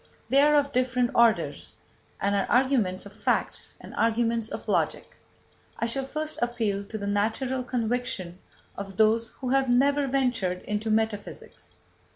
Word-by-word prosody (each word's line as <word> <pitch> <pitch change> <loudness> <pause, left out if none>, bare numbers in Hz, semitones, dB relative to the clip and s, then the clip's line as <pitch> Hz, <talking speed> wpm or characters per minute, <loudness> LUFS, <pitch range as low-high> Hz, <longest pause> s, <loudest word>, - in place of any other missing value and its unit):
They 275 +1 +5
are 300 +1 +5
of 285 -1 +2
different 250 -1 +1
orders, 235 -2 +2 0.4
and 200 +1 0
are 200 -1 +1
arguments 245 -8 +2
of 200 - -11
fact 210 -1 -2
and - - -11
arguments 230 0 +1
of - - -7
logic. - - -1 0.6
I - - -1
shall 265 +3 -2
first 310 +2 -4
appeal 225 -5 -1
to 220 +2 -6
the 200 - -5
natural 220 +6 0
conviction 230 -7 -2 0.4
of 195 -1 -7
those 220 +1 +3
who 255 - -2
have 270 0 +2
never 280 +3 +3
ventured 245 -9 0
into 210 +1 -3
metaphysics. 220 -1 -3
230 Hz, 150 wpm, -26 LUFS, 210-260 Hz, 0.6 s, They